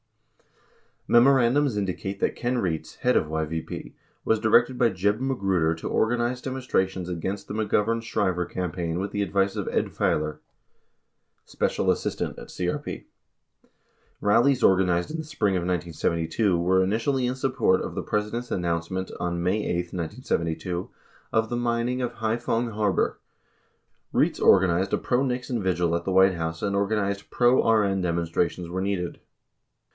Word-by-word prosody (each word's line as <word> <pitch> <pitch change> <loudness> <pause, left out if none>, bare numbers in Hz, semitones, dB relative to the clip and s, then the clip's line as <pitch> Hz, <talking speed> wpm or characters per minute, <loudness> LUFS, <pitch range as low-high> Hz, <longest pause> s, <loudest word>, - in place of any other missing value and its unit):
Memorandums 130 0 +4
indicate 100 0 -3
that - - 0
Ken 125 +1 -1
Rietz, 85 -8 -2
head - - +2
of - - +2
YVP, 80 +1 -4 0.3
was 110 - +2
directed 120 +3 +3
by 115 - +5
J 95 0 +1
eb 105 +2 -1
Magruder 95 -11 +1
to 80 - -6
organize 120 +2 0
demonstrations 95 -9 -1
against 95 +4 -4
the - - -5
McGovern 110 +1 +1
Shriver 95 -5 -1
campaign 85 -2 -3
with 100 +2 -3
the 105 - -2
advice 100 -1 +1
of - - -3
Ed - - 0
Failor, 75 0 0 1.1
special - - 0
assistant - - -3
at - - -10
CRP. 90 0 -3
44 - - -6 1.2
Rallies 120 +6 +3
organized 90 - +3
in 160 - -3
the 160 - -4
spring 105 -10 0
of 90 - 0
1972 85 +2 0
were 95 +2 +3
initially 125 +6 0
in 125 - -1
support 130 -8 +1
of - - -5
the - - -3
President's 105 +3 -2
announcement 85 +1 -2
on 85 -1 -2
May 100 +4 +1
8, 85 0 -2
1972, 85 -1 -3 0.4
of 110 0 +2
the 120 - -2
mining 120 +1 0
of 120 -1 -2
Hai 110 0 -1
phong 120 0 -1
Harbor. 105 -3 0 0.9
Rietz - - +2
organized 95 0 +4
a - - +4
pro 125 +1 0
Nixon 125 -2 -2
vigil 90 -3 +1
at 85 0 -1
the 95 - -1
White 95 0 +5
House 80 -1 -4
45 - - 0
and 100 - -1
organized 100 0 -1
"pro 120 -1 +3
RN 100 -4 +3
demonstrations 85 0 -1
where 95 +2 -3
needed." 95 -3 -2
100 Hz, 155 wpm, -25 LUFS, 90-115 Hz, 1.2 s, by